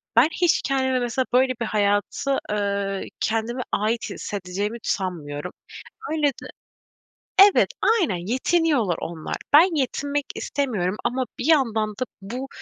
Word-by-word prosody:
ben 245 +6 +7
hiç 340 -2 +4
kendimi 260 -1 +1
mesela 245 +2 -1
böyle 255 0 +4
bir - - +1
hayatı, 210 +7 0
ııı, 200 -1 -1 0.2
kendime 225 +3 -1
ait 220 +2 0
hissedeceğimi 205 +3 -4
sanmıyorum. 160 -7 -3 0.6
Öyle 300 -3 +2 1.1
Evet, 400 0 +6 0.3
aynen, 255 - +1
yetiniyorlar 260 - +2
onlar. 165 -2 -5 0.2
Ben 330 +3 +7
yetinmek 285 +2 -1
istemiyorum 210 -10 -1
ama 255 +1 0
bir 245 - -2
yandan 230 -9 +3
da 210 +5 -3 0.2
bu, 245 +7 -5
235 Hz, 120 wpm, -23 LUFS, 200-275 Hz, 1.1 s, ben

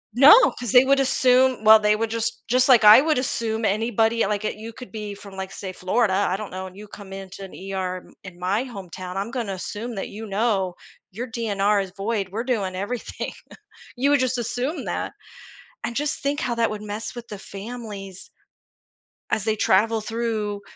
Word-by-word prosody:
No, 290 - +8
'cause 240 -4 -3
they 250 +1 +7
would 275 +1 +4
assume 255 -2 +3
well, 220 0 +10
they 210 0 +3
would 225 +1 -1
just 230 +1 -2
just, 255 +2 +3
like, 245 -4 +7
I 210 +4 +10
would 310 0 +1
assume 225 -3 -1
anybody 225 +2 +1
like 210 +1 -2
it - - -2
you 225 +2 -8
could 250 +2 -11
be 210 -2 -5
from 200 -1 -12
like, 190 0 -5
say, 190 -1 -7
Florida, 195 +3 +1 0.2
I 185 - 0
don't 210 0 -7
know, 185 +1 -5
and 185 +1 -14
you 210 +1 -10
come 205 -1 -11
into 195 0 -8
an 190 - -10
ER 190 -1 -4
in - - -19 0.2
in - - -20
my 195 +6 0
hometown, 185 -5 -8
I'm 200 +3 -2
gonna 235 -5 -3
assume 225 +5 -5
that, 195 - -4
you 220 +2 -8
know, 195 -3 0 0.4
your 235 +7 -5
DNR 210 -3 +1
is 190 -1 -6
void, 200 -1 -2
we're 220 +4 -3
doing 205 -8 -1
everything. 210 +5 -4 0.6
You 270 +3 +2
would 290 - +4
just 255 0 0
assume 245 +6 -3
that. - - -3 0.7
And 235 - -3
just 295 +2 -1
think 285 +1 -1
how 245 - -1
that 230 -1 +2
would 215 -1 -5
mess 210 +3 -5
with 240 -1 -8
the 205 - -7
families 200 -2 -8 1.0
as 215 - 0
they 220 -1 +1
travel 220 +1 +2
through 220 -2 -2
220 Hz, 200 wpm, -23 LUFS, 195-240 Hz, 1.0 s, well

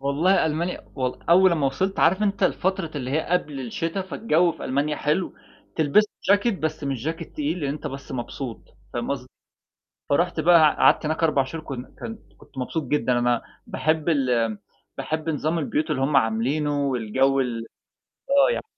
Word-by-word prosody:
والله 155 +7 +2
ألمانيا 165 +3 -2
والل 130 -2 -3
أول 185 +1 +6
أما 155 -4 +1
وصلت 185 +9 -1
عارف 185 +5 +4
أنت 200 -1 0
الفترة 190 -2 0
اللي 130 -2 -4
هي 155 +3 +1
قبل 150 -6 -1
الشتاء 165 - -3
فالجو 175 -4 +2
في 160 - -9
ألمانيا 145 +3 0
حلو، 150 +6 0 0.4
تلبس 160 +6 +4
له 205 -1 +1
جاكيت 205 -1 -1
بس 155 -1 -3
مش 135 -3 -3
جاكيت 165 +1 -4
تقيل 155 +4 -2
لأن 145 - -1
أنت 150 +1 -6
بس 140 -1 -7
مبسوط 125 -1 -5 0.3
فاهم 120 +2 -3
قصدي. 130 -2 -3 0.8
فرُحت 170 +4 +1
بقى 160 -1 +6
قعدت - - +4
هناك 155 +2 -1
4 145 -4 +3
شهور 155 +4 -7
كن 130 -5 -6 0.2
كن 225 -1 -6 0.2
كنت 135 - -19
مبسوط 150 +5 -2
جدًا، 125 -3 +1
أنا 120 -1 +1 0.3
باحب 155 +1 0
ال 120 -8 +1 0.4
باحب 155 +1 -3
نظام 155 +2 -1
البيوت 155 +1 -1
اللي 135 -3 -1
هم 140 +2 +1
عاملينه 135 +6 +1
والجو 130 +2 +1
ال 125 -3 -1 0.7
آه 280 - +5
يعني. - - -3
150 Hz, 175 wpm, -24 LUFS, 135-170 Hz, 0.8 s, أول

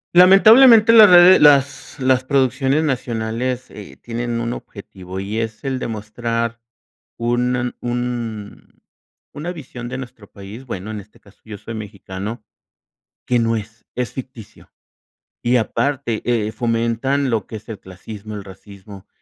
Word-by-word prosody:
Lamentablemente 220 +5 +7
las 215 -3 +9
rede 180 +1 +8
las 140 -1 +3
las 130 0 +2
producciones 135 +2 +1
nacionales, 125 -1 -3
eh, 105 -2 -12
tienen 120 0 -4
un 115 +1 -3
objetivo 95 -2 -10
y 105 +3 -4
es 110 +4 -6
el 135 -1 -2
demostrar 115 +1 -4 0.6
un 120 +1 -1
un 120 -4 -5 0.6
una 170 +5 -5
visión 125 -6 -9
de 130 +1 -5
nuestro 120 -5 -11
país, 100 +6 -11
bueno, 110 -3 -6
en 105 - -5
este 100 +2 -17
caso 100 +1 -22
yo 105 -2 -8
soy 115 +3 -9
mexicano, 105 +1 -7 0.8
que 125 - +1
no 115 -1 +1
es, 110 +1 -9
es 125 -1 -3
ficticio, 125 -5 -11 0.7
y 120 +1 +1
aparte, 125 0 -1
eh, 110 -3 -1
fomentan 120 +4 -1
lo 110 -4 -1
que 110 - -8
es 105 - -10
el 110 -3 -8
clasismo, 105 +3 -10
el 100 - -7
racismo, 100 0 -14
115 Hz, 140 wpm, -19 LUFS, 110-130 Hz, 0.8 s, las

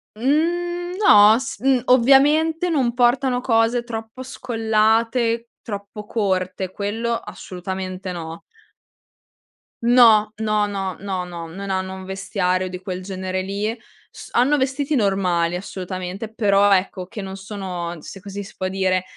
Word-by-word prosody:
Mhmm, 345 +8 0
no, 210 - +7
s 260 -5 -6
mhmm, 260 +1 +2
ovviamente, 295 +7 +4
non 265 -7 +1
portano 245 +1 +2
cose 230 -1 +2
troppo 225 +1 -7
scollate, 230 -1 +1
troppo 205 0 -7
corte, 190 -3 -1
quello 220 +4 -2
assolutamente 185 -2 -6
no. 165 -2 -7 1.4
No, 230 -3 +6
no, 215 -1 +1
no, 195 -2 -3
no, 190 -2 -3
no, 175 -2 -7
non 195 +5 -7
hanno 190 0 -2
un 190 0 -8
vestiario 185 -1 -1
di 180 0 -6
quel 185 -1 -5
genere 185 0 -3
lì. 205 +4 -3 0.3
S - - -12
hanno 265 +5 +3
vestiti 275 +2 0
normali, 185 -6 +1
assolutamente, 185 +3 -6
però, 205 -2 +3
ecco, 185 -1 0
che 210 +3 -8
non 190 0 -6
sono, 190 -4 -5
se 195 - -10
così 200 +1 -7
si 195 - -13
può 185 -1 -2
dire, 185 -1 0
205 Hz, 135 wpm, -21 LUFS, 185-240 Hz, 1.4 s, no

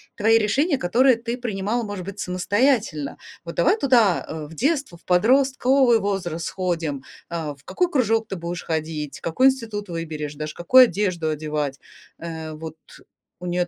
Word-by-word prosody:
твои 225 +2 +4
решения, 275 - +1
которые 245 +8 +4
ты 230 +1 -4
принимала, 225 -1 -2
может 205 -4 -6
быть, 200 0 -7
самостоятельно? 200 - 0 0.3
Вот 170 - -6
давай 275 - +3
туда, 235 - +3
э, 155 -1 -6
в 165 - -12
детство, 275 - -1
в - - -30
подростковый 255 +4 +3
возраст 180 -5 -2
сходим: 165 -7 -2 0.3
а, 160 -3 -3
в 140 0 -22
какой 360 -1 0
кружок 225 - +1
ты 195 - -4
будешь 170 0 -5
ходить, 155 -2 -3
в - - -30
какой 255 +11 +3
институт 220 -6 -2
выберешь, 155 -3 -5
даже 150 +1 -6
какую 255 +9 +7
одежду 180 -6 -1
одевать,- 150 -2 -3 0.4
э, 160 -1 -6
вот 160 0 -8 0.6
у 180 - -8
нее 175 0 0
185 Hz, 160 wpm, -23 LUFS, 160-235 Hz, 0.6 s, какую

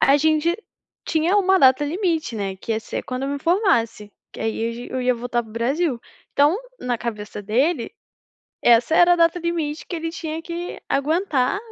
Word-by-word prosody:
A 275 - +5
gente 315 +3 +2 0.5
tinha 330 +5 +2
uma 380 -1 +4
data 265 0 +5
limite, 325 - -1
né, 195 -2 -3
que 225 - -4
ia 220 - -1
ser 220 - -5
quando 255 +1 -4
eu - - -2
me 285 - -2
formasse, 235 - +1 0.2
que - - -10
aí 225 0 -2
eu - - -4
ge 240 +1 -8
eu 255 0 -2
ia 250 0 +2
voltar 240 0 -2
para 220 - -15
o - - -13
Brasil. 255 +4 0 0.3
Então, 290 +5 +4 0.2
na 245 -1 -1
cabeça 210 -3 -5
dele 245 - 0 0.7
essa 235 +5 +5
era 350 0 +6
a - - -2
data 335 +1 +3
limite 325 -3 -2
que 350 - -4
ele 330 0 -3
tinha 325 -1 -5
que 345 +1 -6
aguentar 300 +1 +1
285 Hz, 195 wpm, -22 LUFS, 235-335 Hz, 0.7 s, era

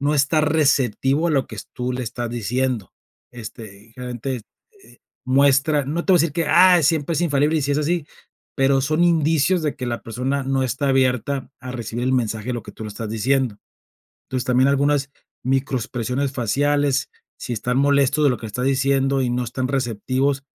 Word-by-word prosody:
no 145 +2 +1
está 150 +2 +2
receptivo 145 -1 +2
a - - 0
lo 135 -4 +1
que - - -10 0.2
tú 125 0 -3
le 125 0 -3
estás 120 +1 -4
diciendo, 120 -2 -2 0.4
este, 110 -2 -11
generalmente, 125 0 -5 0.4
eh, - - -19 0.3
muestra 140 +2 +3
no 165 +4 -2
te 190 - +3
voy - - +7
a - - +4
decir 165 -3 0
que: 165 -1 -1
"Ah, 180 -2 +6
siempre 155 +2 +1
es 155 - 0
infalible, 150 0 +2
y - - -2
sí 140 +1 0
es 140 - +1
así", 155 +1 -1 0.5
pero 135 0 +3
son 155 +4 +1
indicios 165 +1 +2
de 150 - -1
que 125 - -5
la 120 -1 -3
persona 130 +4 -2
no 135 0 0
está 135 +2 -1
abierta 130 +1 0
a 130 -1 -7
recibir 120 0 -4
el 130 - +1
mensaje 115 -2 -1
de - - 0
lo 120 - -5
que 105 - -10
tú 110 - -9
le - - -5
estás 105 +1 -6
diciendo, 125 0 0 0.7
entonces, 130 -2 -2
también 130 +1 +3
algunas 140 0 +1 0.3
microexpresiones 130 0 -1
faciales, 145 +3 +1 0.3
si 125 - -6
están 125 +3 -1
molestos 140 +1 +3
de 145 - +5
lo 125 - 0
que 115 - -9
estás 125 +4 -3
diciendo 135 0 +1
y 125 - 0
no 125 +1 -1
están 130 +2 -3
receptivos, 135 +2 -1
135 Hz, 190 wpm, -21 LUFS, 125-145 Hz, 0.7 s, voy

